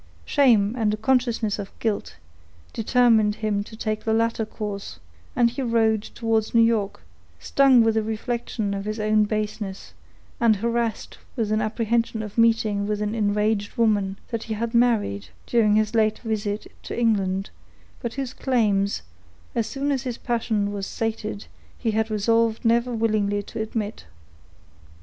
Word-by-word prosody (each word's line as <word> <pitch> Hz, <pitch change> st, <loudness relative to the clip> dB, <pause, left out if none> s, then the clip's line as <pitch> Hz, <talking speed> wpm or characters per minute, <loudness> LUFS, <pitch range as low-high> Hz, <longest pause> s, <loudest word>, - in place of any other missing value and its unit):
Shame, 230 Hz, -8 st, +4 dB
and 220 Hz, -4 st, +1 dB
a -, -, -13 dB
consciousness 235 Hz, -3 st, +1 dB
of 200 Hz, -1 st, -7 dB
guilt, 220 Hz, -3 st, -2 dB, 0.6 s
determined 225 Hz, -2 st, +3 dB
him 210 Hz, -2 st, -1 dB
to 220 Hz, -, -11 dB
take 215 Hz, -1 st, -2 dB
the 220 Hz, -, +1 dB
latter 230 Hz, -1 st, 0 dB
course, 205 Hz, -2 st, -6 dB, 0.4 s
and 235 Hz, -1 st, +3 dB
he 250 Hz, -, -4 dB
rode 225 Hz, -3 st, +2 dB
towards 225 Hz, 0 st, -1 dB
New 230 Hz, -, +7 dB
York, 220 Hz, -3 st, 0 dB, 0.4 s
stung 270 Hz, -4 st, +5 dB
with 225 Hz, 0 st, +3 dB
the 220 Hz, -, +1 dB
reflection 220 Hz, -1 st, -3 dB
of 200 Hz, 0 st, -4 dB
his 215 Hz, +1 st, -3 dB
own 215 Hz, 0 st, +3 dB
baseness, 210 Hz, -2 st, -4 dB, 0.5 s
and 230 Hz, -2 st, +4 dB
harassed 230 Hz, +2 st, -2 dB, 0.2 s
with 225 Hz, -5 st, -1 dB
the 215 Hz, -, +2 dB
apprehension 225 Hz, +1 st, 0 dB
of 210 Hz, -2 st, -8 dB
meeting 225 Hz, -3 st, +2 dB
with 210 Hz, 0 st, -1 dB
an 210 Hz, 0 st, -1 dB
enraged 210 Hz, -1 st, 0 dB
woman, 205 Hz, -4 st, +2 dB
that 230 Hz, -1 st, -3 dB
he 220 Hz, -, -3 dB
had 230 Hz, +2 st, -3 dB
married 225 Hz, -, +2 dB, 0.2 s
during 215 Hz, -3 st, +3 dB
his 215 Hz, 0 st, +1 dB
late 215 Hz, -1 st, +2 dB
visit 215 Hz, -2 st, -3 dB, 0.2 s
to -, -, -5 dB
England, 195 Hz, -4 st, +1 dB, 0.5 s
but 235 Hz, -1 st, -4 dB
whose 270 Hz, -2 st, -4 dB
claims, 205 Hz, -6 st, +1 dB, 0.5 s
as 230 Hz, -2 st, 0 dB
soon 280 Hz, +1 st, -2 dB
as 270 Hz, -3 st, 0 dB
his 250 Hz, -3 st, -4 dB
passion 225 Hz, -4 st, -1 dB
was 200 Hz, -1 st, -4 dB
sated, 220 Hz, -2 st, -3 dB, 0.3 s
he 230 Hz, -, -1 dB
had 220 Hz, +1 st, 0 dB
resolved 225 Hz, +2 st, +1 dB
never 235 Hz, +2 st, +3 dB
willingly 215 Hz, -3 st, 0 dB
to 220 Hz, -, -6 dB
admit. 220 Hz, -1 st, -4 dB
220 Hz, 155 wpm, -24 LUFS, 210-230 Hz, 0.6 s, New